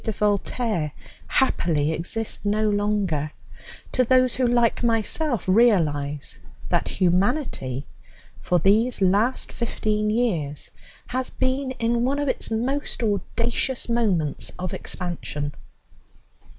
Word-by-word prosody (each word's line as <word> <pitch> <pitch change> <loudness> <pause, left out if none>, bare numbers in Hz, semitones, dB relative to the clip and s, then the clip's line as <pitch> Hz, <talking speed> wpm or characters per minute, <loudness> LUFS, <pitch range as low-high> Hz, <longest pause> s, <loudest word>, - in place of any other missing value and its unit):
de 220 - -1
Voltaire 205 - 0 0.4
happily 160 - +2
exist 195 +7 -3
no 210 +1 +1
longer, 205 -8 0 0.6
to 255 - +3
those 255 0 +4
who, 255 -1 +2
like 240 -1 +2
myself, 235 +2 0
realize 155 - +2 0.3
that - - +1
humanity, 180 - 0 0.6
for 180 - +2
these 215 +8 +3
last 205 +6 +2
fifteen 215 -2 -1
years, 180 - -1 0.3
has 255 +1 -2
been 260 +1 -1
in 235 -1 0
one 270 +3 +1
of 290 0 -1
its - - -2
most 250 +4 -1
audacious 230 +5 -1
moments 200 -11 0
of 180 -1 -4
expansion. 155 -5 -4
215 Hz, 110 wpm, -24 LUFS, 175-240 Hz, 0.6 s, those